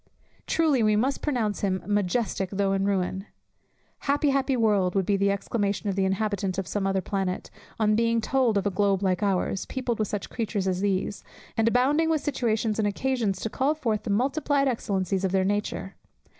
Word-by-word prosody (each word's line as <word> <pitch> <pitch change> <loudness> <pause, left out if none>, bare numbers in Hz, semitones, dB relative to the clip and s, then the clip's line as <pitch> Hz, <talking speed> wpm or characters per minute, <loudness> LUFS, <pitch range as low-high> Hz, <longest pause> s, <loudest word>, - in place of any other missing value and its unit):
Truly 310 -6 +2
we 215 -1 +3
must 260 +6 0
pronounce 235 -8 -1
him 190 -3 -1
"majestic 205 -1 0
though 195 0 0
in 195 0 +1
ruin." 190 0 -1 0.7
"Happy, 285 0 +1
happy 270 -1 +1
world," 205 -5 +2
would 195 -2 +2
be 200 - +2
the 200 0 +2
exclamation 200 0 -1
of - - -4
the 195 -1 +1
inhabitant 195 -1 -1
of 195 - -1
some 200 0 -1
other 195 0 +1
planet, 190 -1 -3 0.3
on 215 -1 +3
being 230 +1 +2
told 240 -1 +1
of 200 - 0
a 200 - +1
globe 195 0 +1
like 185 -2 +1
ours, 195 -1 0
peopled 250 -4 -2
with 215 - +1
such 205 -1 -4
creatures 215 -4 -2
as 185 0 0
these, 200 0 -1 0.3
and 225 0 +2
abounding 275 +7 +3
with 315 -2 +1
situations 225 -6 0
and 210 - +2
occasions 215 -3 -1
to 225 - -2
call 280 +4 +1
forth 225 -9 -1
the - - -6
multiplied 275 +5 +1
excellencies 195 -6 -1
of 190 - +1
their 190 0 +2
nature. 205 -1 -2
205 Hz, 190 wpm, -26 LUFS, 195-240 Hz, 0.7 s, we